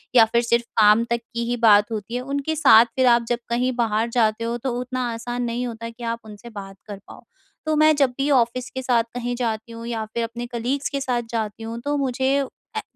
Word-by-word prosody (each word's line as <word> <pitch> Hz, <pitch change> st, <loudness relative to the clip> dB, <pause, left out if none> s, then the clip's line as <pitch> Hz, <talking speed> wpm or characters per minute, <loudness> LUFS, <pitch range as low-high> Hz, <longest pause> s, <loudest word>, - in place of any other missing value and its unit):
या 225 Hz, -2 st, +8 dB
फिर 235 Hz, +2 st, +1 dB
सिर्फ 235 Hz, 0 st, +2 dB, 0.2 s
काम 210 Hz, +2 st, +6 dB
तक 235 Hz, 0 st, +1 dB
की 235 Hz, 0 st, -2 dB
ही 245 Hz, -, 0 dB
बात 210 Hz, -2 st, +5 dB
होती 220 Hz, +2 st, -4 dB
है। 250 Hz, -, -1 dB
उनके 280 Hz, +4 st, -2 dB
साथ 240 Hz, -6 st, +7 dB
फिर 260 Hz, -1 st, +3 dB
आप 235 Hz, -1 st, +4 dB
जब 240 Hz, 0 st, 0 dB
कहीं 250 Hz, +2 st, +1 dB
बाहर 225 Hz, -1 st, 0 dB
जाते 230 Hz, -1 st, +1 dB
हो, 235 Hz, +1 st, -2 dB
तो 255 Hz, +1 st, -3 dB
उतना 250 Hz, 0 st, -3 dB
आसान 240 Hz, +2 st, -4 dB
नहीं 240 Hz, +1 st, -2 dB
होता 230 Hz, 0 st, -6 dB
कि 230 Hz, +1 st, -12 dB
आप 230 Hz, 0 st, -2 dB
उनसे 215 Hz, +2 st, -11 dB
बात 195 Hz, -3 st, -9 dB
कर 205 Hz, -1 st, -7 dB
पाओ। -, -, -13 dB, 0.4 s
तो 310 Hz, 0 st, +1 dB
मैं 310 Hz, 0 st, +5 dB
जब 275 Hz, -3 st, +3 dB
भी 275 Hz, +2 st, 0 dB
ऑफ़िस 250 Hz, 0 st, +1 dB
के 260 Hz, -, -5 dB
साथ 245 Hz, -3 st, +2 dB
कहीं 245 Hz, 0 st, -3 dB
जाती 230 Hz, -2 st, -3 dB
हूँ 230 Hz, 0 st, -8 dB
या 225 Hz, -2 st, -3 dB
फिर 235 Hz, -, -1 dB
अपने 235 Hz, +1 st, -5 dB
कलीग्स 245 Hz, +4 st, -2 dB
के 280 Hz, -1 st, -3 dB
साथ 250 Hz, -3 st, 0 dB
जाती 220 Hz, -1 st, -3 dB
हूँ, 230 Hz, +1 st, -5 dB
तो 290 Hz, +2 st, -1 dB
मुझे 265 Hz, 0 st, 0 dB, 0.4 s
ऐ -, -, 0 dB
235 Hz, 235 wpm, -23 LUFS, 230-255 Hz, 0.4 s, या